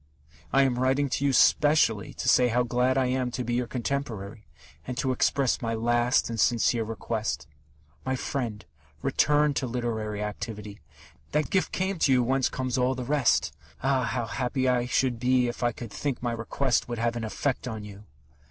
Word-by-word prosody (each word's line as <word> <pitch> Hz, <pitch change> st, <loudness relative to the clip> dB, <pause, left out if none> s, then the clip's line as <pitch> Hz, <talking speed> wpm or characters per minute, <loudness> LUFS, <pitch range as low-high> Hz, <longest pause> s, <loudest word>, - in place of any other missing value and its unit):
I 135 Hz, -, +5 dB
am 125 Hz, -2 st, +1 dB
writing 135 Hz, +2 st, +2 dB
to 140 Hz, -, -1 dB
you 140 Hz, -, +3 dB
specially 135 Hz, -5 st, +3 dB
to -, -, -4 dB
say 125 Hz, -, +5 dB
how 125 Hz, +1 st, +2 dB
glad 125 Hz, +2 st, +1 dB
I 130 Hz, -, +3 dB
am 125 Hz, 0 st, 0 dB
to 125 Hz, +1 st, -4 dB
be 120 Hz, 0 st, -2 dB
your 120 Hz, 0 st, 0 dB
contemporary, 115 Hz, -5 st, -4 dB, 0.4 s
and 125 Hz, -1 st, -4 dB
to 135 Hz, -1 st, 0 dB
express 130 Hz, +1 st, +1 dB
my 115 Hz, -1 st, -1 dB
last 120 Hz, +2 st, +2 dB
and 115 Hz, -1 st, -4 dB
sincere 115 Hz, +1 st, +2 dB
request. 110 Hz, -, -3 dB, 0.6 s
My 130 Hz, -, -1 dB
friend, 120 Hz, -6 st, -4 dB, 0.4 s
return 150 Hz, 0 st, +3 dB
to 130 Hz, -, -1 dB
literary 110 Hz, -3 st, -3 dB
activity! 105 Hz, -1 st, -6 dB, 0.5 s
That 150 Hz, 0 st, 0 dB
gift 190 Hz, -, +1 dB
came 190 Hz, -1 st, -2 dB
to 140 Hz, -, +3 dB
you 125 Hz, -1 st, +4 dB
whence 130 Hz, +1 st, +1 dB
comes 130 Hz, -1 st, -2 dB
all 125 Hz, +1 st, +2 dB
the 130 Hz, -, -4 dB
rest. 130 Hz, -, +1 dB, 0.3 s
Ah, 135 Hz, -2 st, +2 dB
how 120 Hz, 0 st, -2 dB
happy 125 Hz, +4 st, -1 dB
I 125 Hz, -1 st, +2 dB
should 125 Hz, -1 st, +1 dB
be 125 Hz, 0 st, +3 dB
if 120 Hz, -, -5 dB
I 120 Hz, -1 st, +2 dB
could 115 Hz, -1 st, -9 dB
think 135 Hz, 0 st, -3 dB
my 120 Hz, -, 0 dB
request 120 Hz, +3 st, -1 dB
would 120 Hz, -, -3 dB
have 120 Hz, +1 st, 0 dB
an 120 Hz, -, -3 dB
effect 125 Hz, +5 st, -2 dB
on 110 Hz, -3 st, -5 dB
you!... 105 Hz, 0 st, -11 dB
125 Hz, 190 wpm, -27 LUFS, 115-130 Hz, 0.6 s, I